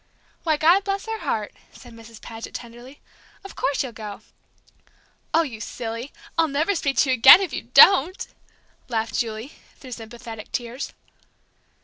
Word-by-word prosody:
"Why, 315 -2 +1
God 345 +6 +4
bless 395 0 -3
her 445 0 -4
heart!" 210 -2 -3 0.2
said 245 -2 -14
Mrs. 230 -1 -14
Paget, 225 0 -9
tenderly, 240 +4 -10 0.4
"of 390 - -11
course 280 - -1
you'll 260 - -6
go!" 210 -2 -9 1.1
"Oh, 330 +1 +3
you 230 -8 -8
silly! 230 +4 -6 0.3
I'll 325 - +4
never 305 +7 0
speak 275 -8 -2
to 265 +2 +3
you - - +3
again 255 +8 +9
if 390 -3 -4
you - - -3
don't!" 370 -1 +6 0.6
laughed 225 -2 -2
Julie, 225 +3 -4 0.2
through 255 - -13
sympathetic 230 -1 -9
tears. 245 +3 -5
250 Hz, 150 wpm, -23 LUFS, 225-315 Hz, 1.1 s, again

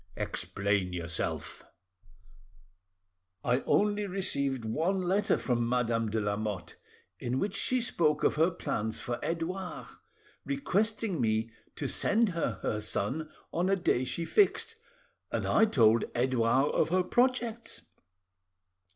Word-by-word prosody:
"Explain 100 -2 -1
yourself." 85 -1 -4 1.8
"I 125 +1 +2
only 205 0 +2
received 140 - -1
one 175 - 0
letter 190 +4 +2
from 120 -2 0
Madame 115 -2 +1
de 110 +1 0
Lamotte, 105 -4 -3 0.4
in 125 +2 -2
which 200 +6 -1
she 255 - +2
spoke 165 - +1
of - - +4
her 160 +3 +3
plans 110 - -3
for 120 -1 -3
Edouard, 180 +3 -3 0.6
requesting 220 - 0
me 110 0 +1 0.2
to - - -3
send 225 +1 +2
her 165 - -2
her 105 - 0
son 130 +9 -1 0.2
on 175 +3 +1
a 195 - +4
day 170 -9 +1
she 165 +6 -3
fixed, 410 - +2 0.6
and - - -1
I 220 - +5
told 115 - +4
Edouard 125 +2 +2
of - - +2
her 185 +2 +2
projects. 240 +1 0
150 Hz, 125 wpm, -30 LUFS, -, 1.8 s, I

